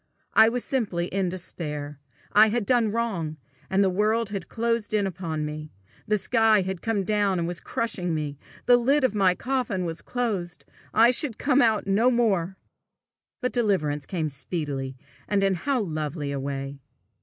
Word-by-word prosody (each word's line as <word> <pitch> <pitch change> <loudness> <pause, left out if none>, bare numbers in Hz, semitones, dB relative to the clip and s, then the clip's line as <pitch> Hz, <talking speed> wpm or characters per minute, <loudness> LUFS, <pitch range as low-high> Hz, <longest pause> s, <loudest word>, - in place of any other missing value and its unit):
I 220 0 +7
was 245 +1 -3
simply 205 -10 -1
in 190 -1 0
despair. 150 -5 -5 0.3
I 215 +1 +7
had 230 0 -1
done 235 -1 +3
wrong, 195 -9 -2 0.3
and 195 +1 +3
the 190 - +3
world 215 +3 +1
had 195 -4 -5
closed 230 -2 -1
in 205 -2 +2
upon 165 -5 -3
me; 150 0 -6 0.4
the 210 - +3
sky 220 0 +3
had 190 -1 -4
come 220 -3 0
down 205 -1 +1
and 170 -1 -1
was 175 0 -4
crushing 180 -7 -2
me! 145 -2 -4 0.3
The 245 0 +7
lid 275 +4 +2
of 255 - +2
my 190 -3 +3
coffin 245 -6 -1
was 165 -1 -4
closed! 200 -8 -3 0.3
I 230 +3 +6
should 255 -2 +1
come 280 -1 +2 0.3
no 205 +6 +3
more 230 -7 +2
out! 180 +3 -7 0.9
But 250 - -1
deliverance 155 - 0
came 160 -5 -2
speedily 135 -2 -4 0.3
and 200 -1 +1
in 195 -1 +3
how 260 +9 0
lovely 155 -4 -3
a 140 - -2
way! 135 0 -4
195 Hz, 170 wpm, -26 LUFS, 160-225 Hz, 0.9 s, I